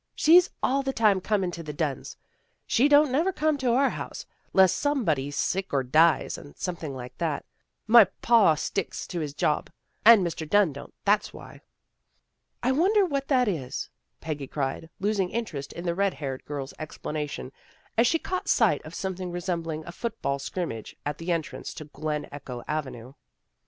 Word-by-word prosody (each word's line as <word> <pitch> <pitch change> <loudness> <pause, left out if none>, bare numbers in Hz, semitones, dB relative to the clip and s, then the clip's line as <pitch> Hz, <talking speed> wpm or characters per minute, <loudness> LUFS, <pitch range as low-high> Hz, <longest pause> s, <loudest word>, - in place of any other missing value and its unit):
" - - -50
She's 350 +3 +6
all 275 +2 +2
the 270 0 -1
tune 210 -5 +3
comin' 195 -2 0
to 170 - -7
the 150 -2 -6
Dunns. 145 -5 -3 0.5
She 260 +5 +3
don't 295 -1 +5
never 325 +9 +2
come 310 -3 +1
to 250 -3 +1
our 270 +2 +3
home, - - -5 0.4
'less 190 -2 +5
some 285 -4 0
body's 145 -3 0
sick 190 +6 -1
or 135 -2 +1
dies, 155 +5 +3
or 145 - -13
something 165 -6 -4
like 125 0 -8
that. 160 -4 -2 0.4
My 225 -1 +8
pa 200 -2 +4
he - - -11
sticks 195 +5 -3
to 175 - -4
his 150 -3 -4
job, 150 0 0 0.3
and 220 -4 +8
Mr. 160 -2 -4
Dunn 205 -6 +4
don't, 140 - -10
that's 205 +1 +2
why." - - -12 0.5
" - - -48
I 255 - +3
wonder 385 +9 +3
what 275 -5 -2
that 255 -4 +3
is," 150 -11 -3 0.3
Peggy 150 -4 -4
cried, 140 +3 -3
losing 200 -2 0
interest 170 -13 -4
in 170 - -7
the 170 - +1
red 195 0 0
haired 135 -2 -5
girl's 140 -2 -5
explanation, 150 -3 -5 0.4
as 230 +2 +4
she 330 - +3
caught 370 +3 -4
sight - - +3
of - - -10
something 185 -2 -4
resembling 170 -3 -3
a - - -7
football 175 -9 -3
scrimmage 135 - -5
at 145 0 -3
the 170 +2 -3
entrance 165 -3 -3
to 155 - -7
Glen 150 0 -4
Echo 130 -4 -7
Avenue. 130 -5 -4
175 Hz, 185 wpm, -27 LUFS, 150-230 Hz, 0.5 s, My